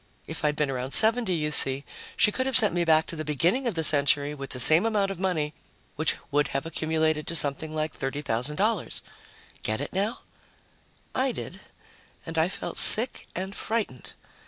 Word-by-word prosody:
If -, -, -7 dB
I'd 150 Hz, -1 st, +1 dB
been 150 Hz, -2 st, -1 dB
around 130 Hz, +1 st, -2 dB
70, 225 Hz, -1 st, +5 dB
you 150 Hz, -3 st, -1 dB
see, 135 Hz, -2 st, +4 dB, 0.3 s
she 210 Hz, -, +4 dB
could 260 Hz, +4 st, -2 dB
have 265 Hz, -, +5 dB
sent 215 Hz, -7 st, +5 dB
me 175 Hz, 0 st, 0 dB
back 160 Hz, -1 st, +3 dB
to -, -, -7 dB
the 155 Hz, -, -5 dB
beginning 170 Hz, -, 0 dB
of 225 Hz, -, -2 dB
the 160 Hz, -, -1 dB
century 145 Hz, -1 st, +2 dB
with 140 Hz, -2 st, -8 dB
the 125 Hz, -, -3 dB
same 155 Hz, +7 st, +8 dB
amount 205 Hz, -3 st, 0 dB
of 195 Hz, -, -8 dB
money, 160 Hz, -6 st, -2 dB, 0.4 s
which 155 Hz, 0 st, +1 dB, 0.2 s
would 145 Hz, 0 st, +1 dB
have 135 Hz, +2 st, -4 dB
accumulated 160 Hz, -1 st, -1 dB
to 170 Hz, -, -1 dB
something 155 Hz, +1 st, -1 dB
like 155 Hz, 0 st, -4 dB
$30,000. 145 Hz, -, -2 dB, 0.6 s
Get 110 Hz, 0 st, -3 dB
it 145 Hz, -, -5 dB
now? 200 Hz, +5 st, -2 dB, 0.9 s
I 260 Hz, 0 st, 0 dB
did. -, -, -8 dB, 0.6 s
And 165 Hz, -, -7 dB
I 160 Hz, +3 st, +1 dB
felt 200 Hz, -, -6 dB
sick 240 Hz, +4 st, +3 dB
and 190 Hz, +2 st, -5 dB
frightened. 220 Hz, -, -4 dB
160 Hz, 180 wpm, -25 LUFS, 145-195 Hz, 0.9 s, same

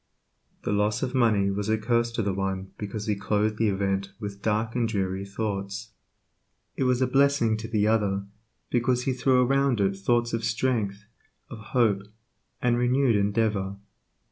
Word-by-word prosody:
The -, -, -1 dB
loss 105 Hz, +2 st, +1 dB
of 125 Hz, -, -2 dB
money 110 Hz, -6 st, +3 dB
was 100 Hz, +1 st, -2 dB
a 110 Hz, -, +3 dB
curse 115 Hz, +1 st, +1 dB
to 115 Hz, -, -1 dB
the 100 Hz, -1 st, 0 dB
one 95 Hz, 0 st, -3 dB
because 105 Hz, 0 st, -4 dB
he 105 Hz, -, +1 dB
clothed 105 Hz, +2 st, 0 dB
the 110 Hz, -1 st, +2 dB
event 95 Hz, 0 st, -1 dB
with 100 Hz, -1 st, -6 dB
dark 110 Hz, +2 st, 0 dB
and 120 Hz, -2 st, +1 dB
dreary 95 Hz, -3 st, -1 dB
thoughts; 100 Hz, +1 st, -4 dB, 0.8 s
it 130 Hz, -, 0 dB
was 125 Hz, 0 st, +2 dB
a -, -, +4 dB
blessing 135 Hz, -4 st, +3 dB
to 110 Hz, 0 st, -6 dB
the 105 Hz, -2 st, +1 dB
other, 100 Hz, -3 st, +1 dB, 0.5 s
because 125 Hz, 0 st, +1 dB
he 130 Hz, -, 0 dB
threw 125 Hz, 0 st, +3 dB
around 135 Hz, -2 st, +2 dB
it 100 Hz, -1 st, +2 dB
thoughts 120 Hz, +4 st, +1 dB
of 115 Hz, 0 st, -1 dB
strength, 110 Hz, -3 st, -1 dB, 0.5 s
of 115 Hz, -, -7 dB, 0.2 s
hope, 105 Hz, -5 st, +3 dB, 0.6 s
and 120 Hz, -1 st, +2 dB
renewed 125 Hz, 0 st, +3 dB
endeavor. 100 Hz, -1 st, 0 dB
110 Hz, 170 wpm, -26 LUFS, 100-120 Hz, 0.8 s, a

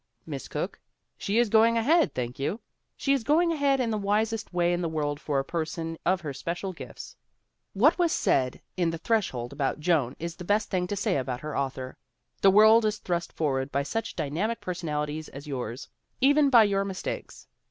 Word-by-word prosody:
Miss -, -, -6 dB
Cooke? -, -, -4 dB, 0.4 s
She 200 Hz, +3 st, -2 dB
is 240 Hz, 0 st, +4 dB
going 230 Hz, +2 st, +5 dB
ahead, 310 Hz, +9 st, +3 dB
thank 125 Hz, 0 st, -4 dB
you! 170 Hz, +11 st, -2 dB, 0.4 s
She 275 Hz, -, +1 dB
is 270 Hz, -4 st, 0 dB
going 330 Hz, +6 st, +3 dB
ahead 280 Hz, -4 st, +2 dB
in 240 Hz, -3 st, 0 dB
the 215 Hz, -, -1 dB
wisest 215 Hz, +2 st, 0 dB
way 175 Hz, -1 st, +2 dB
in 175 Hz, -, -1 dB
the 170 Hz, -, -1 dB
world 145 Hz, -2 st, -2 dB
for 145 Hz, -2 st, -2 dB
a 135 Hz, -, 0 dB
person 165 Hz, 0 st, -3 dB
of 185 Hz, 0 st, +2 dB
her 150 Hz, -4 st, -5 dB
special 175 Hz, +7 st, -4 dB
gifts. -, -, -10 dB, 0.6 s
What 280 Hz, -, +4 dB
was 345 Hz, -2 st, +3 dB
said 130 Hz, -, +1 dB
in 175 Hz, -2 st, +1 dB
The 165 Hz, -, -3 dB
Threshold 160 Hz, -, -1 dB
about 140 Hz, 0 st, -1 dB
Joan 150 Hz, -6 st, +1 dB
is 170 Hz, 0 st, -6 dB
the -, -, -7 dB
best 205 Hz, +4 st, 0 dB
thing 180 Hz, -2 st, 0 dB
to 205 Hz, -, -2 dB
say 200 Hz, -4 st, 0 dB
about 125 Hz, -2 st, -3 dB
her 155 Hz, 0 st, -5 dB
author: 130 Hz, -1 st, -3 dB, 0.4 s
"The 195 Hz, -, +7 dB
world 220 Hz, +3 st, +7 dB
is 215 Hz, 0 st, 0 dB
thrust 175 Hz, -1 st, -3 dB
forward 135 Hz, -3 st, -1 dB
by 140 Hz, +1 st, 0 dB
such 225 Hz, +10 st, -3 dB
dy 150 Hz, -4 st, -3 dB
namic 215 Hz, +9 st, -1 dB
personalities 155 Hz, -4 st, -3 dB
as 140 Hz, +1 st, -10 dB
yours, 125 Hz, -3 st, -5 dB, 0.3 s
even 285 Hz, +2 st, +5 dB
by 235 Hz, -4 st, +7 dB
your 200 Hz, -1 st, +1 dB
mistakes. 195 Hz, -2 st, -6 dB
180 Hz, 200 wpm, -27 LUFS, 150-220 Hz, 0.6 s, The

